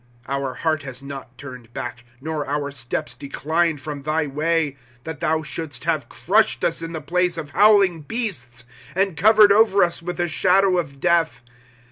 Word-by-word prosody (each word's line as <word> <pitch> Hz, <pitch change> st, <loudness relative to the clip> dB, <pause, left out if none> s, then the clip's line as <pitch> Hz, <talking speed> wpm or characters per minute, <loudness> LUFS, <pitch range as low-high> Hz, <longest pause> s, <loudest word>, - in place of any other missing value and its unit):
'^ -, -, -35 dB, 0.2 s
Our 135 Hz, -1 st, -3 dB
heart 155 Hz, +1 st, 0 dB
has 135 Hz, -2 st, -8 dB
not 135 Hz, -2 st, -9 dB
turned 125 Hz, -4 st, -11 dB
back, 125 Hz, 0 st, -6 dB, 0.2 s
Nor 155 Hz, 0 st, -4 dB
our 145 Hz, 0 st, -2 dB
steps 130 Hz, +3 st, -4 dB
declined 155 Hz, +2 st, -1 dB
from 145 Hz, 0 st, -6 dB
thy 155 Hz, +2 st, 0 dB
way; 150 Hz, +1 st, 0 dB, 0.3 s
^* -, -, -36 dB
That 160 Hz, -2 st, -7 dB
thou 160 Hz, -1 st, 0 dB
shouldst 155 Hz, -1 st, -4 dB
have -, -, -1 dB
crushed -, -, +1 dB
us -, -, +1 dB
in 165 Hz, 0 st, -5 dB
the 160 Hz, -, -4 dB
place 180 Hz, +3 st, 0 dB
of 150 Hz, -3 st, -6 dB
howhng 195 Hz, -7 st, +4 dB
beasts, 125 Hz, -, -1 dB, 0.3 s
And 190 Hz, -2 st, +1 dB
covered 210 Hz, +4 st, +6 dB
over 200 Hz, -2 st, +5 dB
us 170 Hz, -1 st, -1 dB
with 175 Hz, +1 st, -5 dB
the 175 Hz, -1 st, 0 dB
shadow 185 Hz, +3 st, +3 dB
of 140 Hz, -5 st, -5 dB
death. 170 Hz, -4 st, +1 dB
160 Hz, 180 wpm, -22 LUFS, 140-175 Hz, 0.3 s, covered